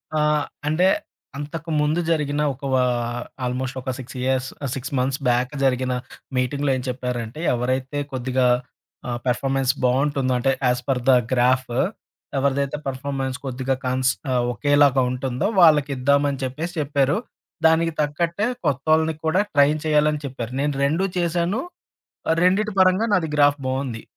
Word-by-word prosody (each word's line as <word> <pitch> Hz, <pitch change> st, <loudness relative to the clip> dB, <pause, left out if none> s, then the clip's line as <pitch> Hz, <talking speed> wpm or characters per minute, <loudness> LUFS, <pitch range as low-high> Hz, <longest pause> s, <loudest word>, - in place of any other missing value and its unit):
ఆ! -, -, +2 dB, 0.5 s
అంటే, 165 Hz, +5 st, +3 dB, 0.5 s
అంతకు 150 Hz, +3 st, -6 dB
ముందు 150 Hz, +3 st, +1 dB
జరిగిన 150 Hz, -2 st, 0 dB
ఒక 130 Hz, -, -18 dB
వా 130 Hz, -1 st, +4 dB, 0.6 s
ఆల్మోస్ట్ 130 Hz, +1 st, -3 dB
ఒక 130 Hz, -, -5 dB
6 130 Hz, 0 st, -9 dB
ఇయర్స్ 130 Hz, 0 st, 0 dB, 0.2 s
ఆహ్, 140 Hz, -, -1 dB
6 135 Hz, +1 st, -6 dB
మంత్స్ 130 Hz, +2 st, 0 dB
బ్యాక్ 125 Hz, +1 st, +2 dB
జరిగిన 130 Hz, -1 st, +1 dB, 0.4 s
మీటింగ్‌లో 140 Hz, +3 st, 0 dB
ఏం -, -, -4 dB
చెప్పారంటే, 125 Hz, 0 st, -4 dB
"ఎవరైతే 130 Hz, +3 st, -1 dB
కొద్దిగా 130 Hz, 0 st, 0 dB, 0.6 s
ఆహ్, 120 Hz, -1 st, -3 dB
పర్‌ఫోర్మెన్స్ 135 Hz, +1 st, +1 dB
బావుంటుందో, 130 Hz, +1 st, +1 dB
అంటే 135 Hz, +2 st, +2 dB, 0.2 s
ఏస్ 125 Hz, 0 st, 0 dB
పర్ 130 Hz, -2 st, +1 dB
ద -, -, +8 dB, 0.2 s
గ్రాఫ్ 130 Hz, +1 st, +2 dB, 0.7 s
ఎవరిదైతే 140 Hz, +1 st, 0 dB
పర్‌ఫోర్మెన్స్ 135 Hz, -1 st, -3 dB
కొద్దిగా 130 Hz, 0 st, -1 dB
కన్స్ 130 Hz, 0 st, +2 dB, 0.4 s
ఒకేలాగా 145 Hz, +1 st, +3 dB
ఉంటుందో, 125 Hz, +6 st, -2 dB
వాళ్ళకిద్దామని" 145 Hz, -3 st, +4 dB
అని 135 Hz, 0 st, -6 dB
చెప్పేసి 155 Hz, +7 st, -4 dB
చెప్పారు. 145 Hz, +1 st, +1 dB, 0.5 s
దానికి 165 Hz, +1 st, +4 dB
తగ్గట్టే 170 Hz, +7 st, 0 dB, 0.2 s
కొత్తవొళ్ళని 155 Hz, +3 st, +2 dB
కూడా 160 Hz, +4 st, +2 dB
ట్రైన్ 145 Hz, +1 st, +4 dB
చేయాలని 150 Hz, -1 st, +2 dB
చెప్పారు. 125 Hz, -3 st, -5 dB
నేను 145 Hz, 0 st, 0 dB
2 160 Hz, +7 st, +1 dB
చేశాను. 175 Hz, +6 st, 0 dB, 0.7 s
ఆహ్, 165 Hz, -, +2 dB
రెండిటి 200 Hz, +3 st, +2 dB
పరంగా 185 Hz, +4 st, +4 dB
నాది 165 Hz, -4 st, +1 dB
గ్రాఫ్ 145 Hz, 0 st, +4 dB
బావుంది. 130 Hz, -4 st, -3 dB
140 Hz, 135 wpm, -22 LUFS, 130-150 Hz, 0.7 s, ద